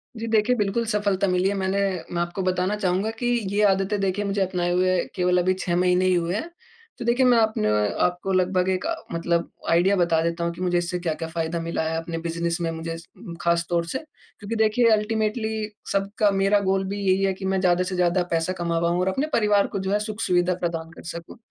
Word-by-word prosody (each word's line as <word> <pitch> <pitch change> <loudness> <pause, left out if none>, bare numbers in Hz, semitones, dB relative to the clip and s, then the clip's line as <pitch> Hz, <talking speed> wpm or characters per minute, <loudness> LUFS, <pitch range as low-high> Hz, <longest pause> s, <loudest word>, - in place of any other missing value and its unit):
जी, 225 0 -5
देखिए 220 +2 +2
बिल्कुल 210 +1 0
सफलता 205 -3 0
मिली 180 +1 +2
है, 200 - -1
मैंने 190 0 0 0.3
मैं 170 - 0
आपको 175 +3 -3
बताना 185 +2 0
चाहूँगा 195 0 0
कि - - -1 0.3
ये 205 +1 +1
आदतें 195 +2 0
देखिए 195 +1 -1
मुझे 200 0 -1
अपनाए 180 -2 0
हुए 185 +1 +2 0.2
केवल 180 -1 +2
अभी 185 +1 +2
6 175 -2 -1
महीने 180 +1 +3
ही 185 - +3
हुए 175 +1 0
हैं। 315 +11 -3 0.5
तो 240 - -6
देखिए 245 +2 +3
मैं 245 -1 +5
आपने 220 - +2 0.3
आपको 180 +2 -1
लगभग 185 0 +2
एक 185 +10 -1 0.3
मतलब 170 0 0 0.2
आइडिया 175 +4 +4
बता 170 -3 +2
देता 170 0 -1
हूँ 170 - 0
कि 180 - -10
मुझे 180 -1 +1
इससे 175 +1 -1
क्या-क्या 165 -1 -3
फायदा 165 0 -2
मिला 165 0 -2
है 160 - -2
अपने 165 0 -4
बिज़नेस 170 0 -2
में 165 - 0
मुझे 165 0 -5
इस 165 +1 -9 0.4
खास 170 0 +1
तौर 170 -1 +1
से। 265 - -2 0.4
क्योंकि 215 +2 -4
देखिए 220 +2 +3
अल्टीमेटली 220 0 0 0.2
सबका 200 +1 +1
मेरा 195 +1 +3
गोल 195 -1 +1
भी 200 +1 -4
यही 190 0 +2
है 195 0 +2
कि 190 +1 -7
मैं 190 0 +1
ज़्यादा 180 -1 +3
से 185 0 -4
ज़्यादा 180 0 +2
पैसा 165 +2 0
कमा 170 -2 -1
पाऊँ 170 +1 +1
और 180 - 0
अपने 270 +10 0
परिवार 210 -2 +3
को 200 - -4
जो 190 0 -2
है 205 - +2
सुख 210 0 -5
सुविधा 180 -2 +2
प्रदान 165 -1 -2
कर - - -13
सकूँ। 170 +7 -9
185 Hz, 225 wpm, -24 LUFS, 175-205 Hz, 0.5 s, मैं